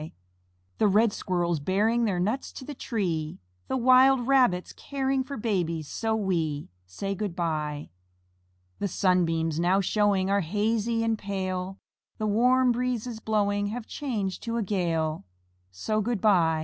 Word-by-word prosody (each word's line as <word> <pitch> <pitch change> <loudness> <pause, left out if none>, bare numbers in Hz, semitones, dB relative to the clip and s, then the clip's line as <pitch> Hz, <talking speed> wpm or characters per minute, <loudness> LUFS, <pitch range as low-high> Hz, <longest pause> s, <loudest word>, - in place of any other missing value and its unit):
The 215 - +4
red 210 +2 +3
Squirrels 175 -3 -1
bearing 215 +9 +1
Their 190 -5 0
nuts 215 +9 -1
to 260 - -9
the 295 - -6
tree, 175 - -3 0.3
The 265 - -1
wild 255 0 +5
Rabbits 250 -9 +2
caring 270 -1 -1
For 280 +1 -7
babies 175 -8 -1
so 225 +6 -1
wee, 165 -8 -1 0.2
Say, 195 - -4
"Good 195 -2 -4
by." 150 - -3 0.9
The 200 - 0
sunbeams 165 -4 +1
now 180 +3 +3
showing 200 -1 +2
Are 200 +1 +2
hazy 220 +5 0
and 225 -1 0
pale, 190 -1 -3 0.4
The 215 - -2
warm 250 +4 +3
breezes 245 -1 -2
blowing 205 -2 0
Have 225 +2 -5
changed 220 -11 -3
to 230 0 -2
a 230 - 0
gale, 165 - -1 0.5
So, 215 - -2
"Good 230 0 -1
by." 170 -6 +3
205 Hz, 145 wpm, -27 LUFS, 175-230 Hz, 0.9 s, wild